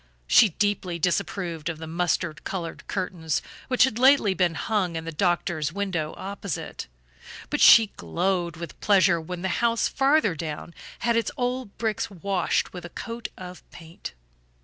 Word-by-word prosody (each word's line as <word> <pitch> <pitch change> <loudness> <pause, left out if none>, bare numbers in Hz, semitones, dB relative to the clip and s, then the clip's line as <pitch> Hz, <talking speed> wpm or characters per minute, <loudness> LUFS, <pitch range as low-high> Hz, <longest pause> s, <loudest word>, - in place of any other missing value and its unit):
She 210 - +6
deeply 190 -1 -1
disapproved 170 -1 -1
of 165 - -4
the 160 - -7
mustard 165 -1 -1
colored 170 -4 -5
curtains 175 -5 -2 0.3
which 255 -1 +4
had 250 -3 +1
lately 260 -6 +5
been 180 -3 +1
hung 190 -5 -1
in 160 0 -4
the 165 - -4
doctor's 170 -2 0
window 175 -5 -2
opposite; 200 -3 -5 0.6
but - - 0
she 225 -3 +8
glowed 175 -1 -1
with 170 0 -8
pleasure 190 -4 +4
when 175 +2 -6
the - - +1
house 235 -1 +2
farther 270 - +2
down 160 +1 -6 0.3
had 235 -1 +2
its 230 - +1
old 250 -3 -3
bricks 220 -1 -1
washed 195 -1 -1
with 180 -2 -7
a 170 - -8
coat 230 +5 -6
of 180 -1 -9
paint. 165 - -10
180 Hz, 155 wpm, -25 LUFS, 165-210 Hz, 0.6 s, she